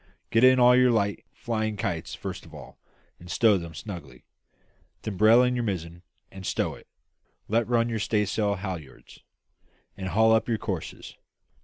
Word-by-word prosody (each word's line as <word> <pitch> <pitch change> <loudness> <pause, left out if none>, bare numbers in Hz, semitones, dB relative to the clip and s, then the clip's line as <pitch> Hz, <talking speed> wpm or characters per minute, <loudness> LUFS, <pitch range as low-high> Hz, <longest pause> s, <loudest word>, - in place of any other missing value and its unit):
Get 115 +2 +3
in 130 0 +7
all 125 0 +7
your 125 0 +5
light 100 -4 0
flying 110 -2 -3
kites 85 -5 -3
first - - -7
of - - -14
all, - - -12 0.4
and 90 - -13
stow 105 0 +3
them 85 -2 -9
snugly; 80 - -9 0.8
then 105 - -4
brail 110 +5 +6
in 125 0 +1
your 120 - -1
mizzen 85 -5 -4 0.3
and 95 0 -10
stow - - -1
it; - - -15 0.6
let 115 +1 +1
run 115 -1 +2
your 115 -2 -2
staysail 105 -1 0
halliards, 90 -7 -8 0.8
and 95 -1 -5
haul 110 +4 +4
up 110 +2 +1
your 115 - +1
courses. 95 -6 -6
105 Hz, 165 wpm, -26 LUFS, 95-115 Hz, 0.8 s, in